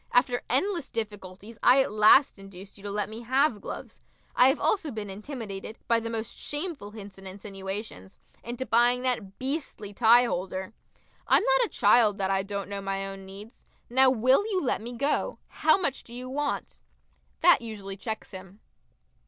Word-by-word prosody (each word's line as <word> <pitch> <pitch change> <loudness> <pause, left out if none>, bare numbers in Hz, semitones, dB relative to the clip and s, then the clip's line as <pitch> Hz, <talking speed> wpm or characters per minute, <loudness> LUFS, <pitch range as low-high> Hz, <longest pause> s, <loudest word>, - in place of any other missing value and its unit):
After 245 0 +2
endless 335 - 0
difficulties 205 0 -6
I 250 +2 +6
at - - -6
last 215 +4 +5
induced 195 0 -12
you 200 - -14
to - - -3
let 205 0 -1
me 220 +2 -8
have 260 -2 +1
gloves. - - -8 0.3
I 250 - +7
have 270 - +2
also 360 -7 +1
been 215 -5 -5
intimidated, 215 -1 -7
by 230 -1 +3
the 230 0 -5
most 225 -1 -4
shameful 295 - -4
hints 205 -2 -10
and 195 - -8
insinuations, 195 - -7 0.3
into 240 +2 -5
buying 245 +2 +3
that 225 -7 -2
beastly 265 -7 -4
tie 235 +3 +6
holder. 190 -2 -3 0.5
I'm - - +4
not - - +3
a - - -7
child 215 -4 +4
that 195 -1 0
I 195 0 +2
don't 200 -1 -5
know 200 0 -5
my 195 0 -2
own 195 0 -8
needs. 205 +4 -11 0.3
Now 260 +1 +6
will 255 - +3
you 395 -4 0
let 250 - 0
me 240 +2 -7
go? 285 - -1
How 315 +2 +3
much 280 -8 -2
do 235 - -11
you 250 +1 -6
want?" 285 +2 -3 0.6
That 350 -4 +6
usually 205 -4 -7
checks 220 +3 -6
him. 190 +1 -11
220 Hz, 175 wpm, -27 LUFS, 195-260 Hz, 0.6 s, I